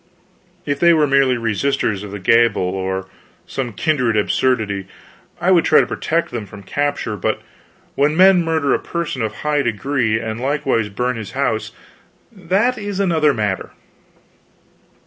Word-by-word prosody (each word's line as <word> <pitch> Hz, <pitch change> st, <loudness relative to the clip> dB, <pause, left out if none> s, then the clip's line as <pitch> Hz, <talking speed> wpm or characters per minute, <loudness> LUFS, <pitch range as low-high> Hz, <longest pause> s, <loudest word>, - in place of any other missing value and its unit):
If 145 Hz, -1 st, -2 dB
they 170 Hz, 0 st, +5 dB
were 155 Hz, -2 st, +3 dB
merely 135 Hz, -2 st, +3 dB
resisters 110 Hz, -2 st, -1 dB
of 105 Hz, -, -7 dB
the 100 Hz, -, -6 dB
gabelle 115 Hz, +1 st, +3 dB
or 95 Hz, +1 st, -3 dB, 0.4 s
some 130 Hz, -3 st, -4 dB
kindred 125 Hz, -4 st, 0 dB
absurdity 105 Hz, -3 st, 0 dB, 0.5 s
I 180 Hz, +3 st, +2 dB
would 175 Hz, -3 st, +5 dB
try -, -, +5 dB
to -, -, +3 dB
protect 165 Hz, +1 st, -2 dB
them 115 Hz, -4 st, -5 dB
from 100 Hz, +1 st, -12 dB
capture; 145 Hz, -1 st, -2 dB
but 100 Hz, -, -1 dB, 0.5 s
when 150 Hz, +3 st, +1 dB
men 185 Hz, -1 st, +6 dB
murder 160 Hz, -4 st, +1 dB
a -, -, +1 dB
person 170 Hz, -7 st, -4 dB
of 110 Hz, -1 st, -2 dB
high 150 Hz, -1 st, +2 dB
degree 120 Hz, -1 st, 0 dB
and 110 Hz, 0 st, -5 dB
likewise 130 Hz, -5 st, 0 dB
burn 125 Hz, +4 st, -2 dB
his 110 Hz, -3 st, -7 dB
house, -, -, -1 dB, 0.6 s
that 205 Hz, +5 st, 0 dB
is 205 Hz, -2 st, -4 dB
another 165 Hz, -6 st, +3 dB
matter." 105 Hz, -6 st, -2 dB
130 Hz, 150 wpm, -19 LUFS, 110-155 Hz, 0.6 s, men